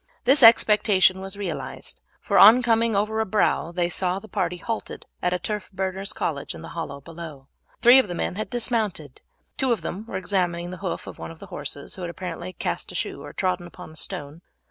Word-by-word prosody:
This 270 +4 +6
expectation 210 -5 +6
was 195 +1 -6
realized, 205 - -5 0.2
for - - +2
on 225 +5 +9
coming 230 -1 +2
over 215 +2 0
a 220 - +1
brow 190 -4 +1
they 175 0 0
saw 180 +1 0
the 220 - -9
party 180 -3 -2
halted 225 +6 -5 0.2
at 180 - +1
a 180 - +1
turf 210 +3 -4
burner's 190 +1 -3
cottage 145 -4 -3
in - - -10
the - - -8
hollow 150 -4 -6
below. 160 -3 -10 0.3
Three 245 +3 +9
of 260 - +2
the 175 - -5
men - - -2
had 215 +4 -4
dismounted; 220 - -2 0.4
two 260 -2 +1
of 225 -6 +1
them 200 +6 -5
were 190 - -4
examining 180 -2 -1
the 185 - -7
hoof 185 -2 -4
of - - -10
one - - -6
of 165 - -11
the - - -11
horses, 140 - -4
which - - -7
had 175 - -3
apparently 175 0 -6
cast - - -3
a - - -10
shoe - - -2
or - - -9
trodden 180 -2 -1
upon 180 -1 -12
a - - -15
stone. 150 +1 -5
185 Hz, 215 wpm, -24 LUFS, 170-215 Hz, 0.4 s, on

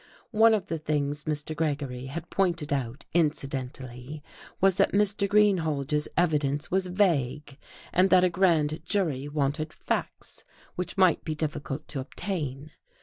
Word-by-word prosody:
One 220 0 +6
of 200 -4 -2
the 165 -4 -3
things 150 -1 -2
Mr. 150 0 -2
Gregory 140 -5 -2
had 165 +5 -7
pointed 170 -6 0
out 130 -1 -3
incidentally 135 -3 -2 0.4
was 195 -1 +4
that 195 - +3
Mr. 200 0 +2
Greenhalge's 160 -8 +2
evidence 150 -4 +1
was 190 0 +1
vague, 150 -7 0 0.3
and 185 +2 +4
that 185 0 +6
a 185 - +4
grand 165 -4 +2
jury 155 -10 0
wanted 150 +2 -1
facts, - - -4 0.3
which 180 +2 -4
might 185 -4 +4
be 155 - -3
difficult 150 -2 -4
to 140 - -4
obtain. 145 -1 -4
155 Hz, 140 wpm, -27 LUFS, 140-180 Hz, 0.4 s, One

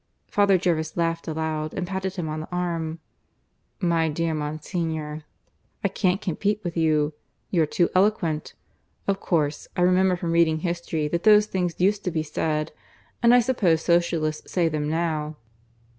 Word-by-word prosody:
Father 200 -2 +3
Jervis 165 -3 -1
laughed 165 0 -1
aloud 155 -1 -2
and 180 - -2
patted 190 +1 -3
him 175 -4 -3
on 155 0 -3
the 155 - -7
arm. 170 -2 -2 0.8
"My 170 -3 +2
dear 165 +2 -1
Monsignor, 155 0 -3 0.6
I 200 - +2
can't 185 -1 +1
compete 205 +3 -1
with 175 -2 -4
you. 155 -2 +2 0.4
You're 165 -4 +3
too 175 +3 +2
eloquent. 185 -5 +1 0.5
Of 195 -1 +1
course, 150 -6 -1
I - - +1
remember 185 +1 +4
from 175 -1 -3
reading 165 -2 +3
history 170 -3 -2
that 170 +2 -1
those 210 0 +6
things 180 -5 -2
used 200 +3 +2
to - - +1
be 160 -2 -1
said, 155 0 -2 0.5
and 235 - +6
I 245 0 +7
suppose 200 -10 +2
Socialists 170 -3 0
say 175 -3 +2
them 150 -2 -1
now. 155 -2 -1
170 Hz, 160 wpm, -25 LUFS, 155-185 Hz, 0.8 s, I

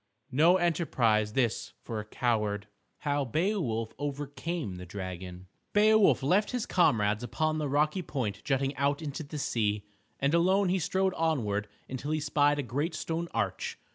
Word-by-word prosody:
No 165 +7 +5
enterprise 120 - +1
this 120 -3 0
for 115 -3 -4
a 105 - -5
coward. 105 -3 0
III 105 -1 -38 0.2
HOW 145 -1 0
BEOWULF 135 - -1
OVERCAME 145 - -4
THE 90 - -8
DRAGON 90 -1 -6 0.3
Beowulf 215 -6 +5
left 190 +9 +3
his 250 -3 -2
comrades 105 - +2
upon 155 +5 0
the 150 -2 -1
rocky 150 +6 +2
point 120 - -3
jutting 135 0 0
out 140 +3 +1
into 145 +1 -4
the 150 0 -6
sea, 105 -6 0 0.3
and 140 +3 +1
alone 185 +3 +3
he 190 +1 +2
strode 190 +3 +1
onward 110 -11 0 0.2
until 130 +3 -5
he 155 0 +1
spied 145 0 +2
a 145 - -1
great 140 +8 -2
stone 165 +1 -2
arch. - - -2
145 Hz, 160 wpm, -29 LUFS, 110-165 Hz, 0.3 s, No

